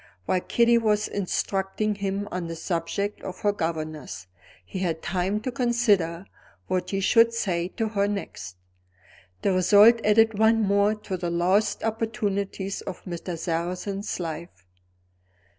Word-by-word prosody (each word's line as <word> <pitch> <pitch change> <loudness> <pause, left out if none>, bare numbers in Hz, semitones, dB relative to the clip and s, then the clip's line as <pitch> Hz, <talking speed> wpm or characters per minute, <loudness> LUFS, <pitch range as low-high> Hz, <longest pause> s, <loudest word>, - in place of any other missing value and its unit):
While 185 - +1
Kitty 235 +3 +3
was 210 -2 +1
instructing 195 +2 -1
him 200 0 -3
on 180 -2 -3
the 165 - -5
subject 175 +5 -3
of 185 0 -7
her 205 - +3
governess, 155 - -4 0.4
he 140 - -6
had 165 -3 -2
time 185 +3 -1
to 255 - -3
consider 210 -8 +1 0.4
what 180 - -1
he 195 - -1
should 230 +3 +4
say 175 -6 -1
to 225 -2 0
her 200 -2 +1
next. 200 - -5 0.9
The 195 - +2
result 205 +5 +6
added 215 0 +4
one 220 0 +4
more 200 +1 +3
to 210 -3 -5
the 175 -1 -3
lost 185 +5 +1
opportunities 210 -3 -2
of - - -7
Mr. 175 -1 -5
Sarrazin's 180 +5 -3
life. 165 - -6
195 Hz, 140 wpm, -25 LUFS, 175-215 Hz, 0.9 s, result